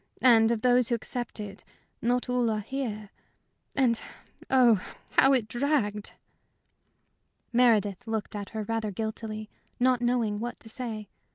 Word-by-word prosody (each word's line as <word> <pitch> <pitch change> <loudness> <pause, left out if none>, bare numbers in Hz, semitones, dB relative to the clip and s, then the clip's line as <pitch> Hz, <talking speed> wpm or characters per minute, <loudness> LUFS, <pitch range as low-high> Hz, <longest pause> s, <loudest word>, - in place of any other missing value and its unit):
And 225 -3 +7
of 230 -2 -1
those 250 -1 +4
who 240 - +2
accepted, 215 -4 -5 0.4
not 245 +2 +1
all 250 -2 +1
are 215 -1 0
here. 215 -4 -4 0.6
And, 245 -4 +2 0.5
oh, 240 -7 +5 0.3
how 270 - +5
it 245 -5 +2
dragged!" 240 -5 0 1.4
Meredith 225 -3 +3
looked 220 -1 -3
at 205 -1 -5
her 220 -1 -4
rather 225 0 -2
guiltily, 215 +1 -4 0.3
not 250 0 +3
knowing 240 -4 +1
what 240 +2 -5
to 225 - -7
say. 220 -3 -4
230 Hz, 130 wpm, -28 LUFS, 215-245 Hz, 1.4 s, And